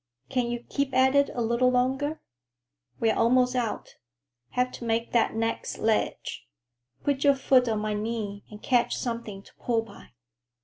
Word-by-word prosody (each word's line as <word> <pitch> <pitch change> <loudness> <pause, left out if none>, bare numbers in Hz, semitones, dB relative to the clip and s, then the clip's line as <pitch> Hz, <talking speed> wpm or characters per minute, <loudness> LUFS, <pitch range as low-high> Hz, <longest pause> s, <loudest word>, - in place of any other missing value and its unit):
Can 250 -2 0
you 240 0 -4
keep 280 -1 -1
at 260 +1 +5
it 280 0 +4
a 240 - 0
little 235 +2 +3
longer? 265 +5 0 0.8
We're 225 -1 +2
almost 250 +2 +3
out. 235 -4 -3 0.5
Have 250 0 0
to - - -9
make 230 0 -1
that 235 -2 +2
next 225 0 -2
ledge. 220 -1 -1 0.6
Put 280 -1 0
your 280 -1 +5
foot 260 -2 +3
on 215 -1 0
my 215 0 -1
knee 210 -1 -3
and 210 0 -12
catch 245 -2 +2
something 230 -5 -4
to - - -19
pull 230 -2 0
by." 225 - -15
240 Hz, 165 wpm, -27 LUFS, 225-255 Hz, 0.8 s, at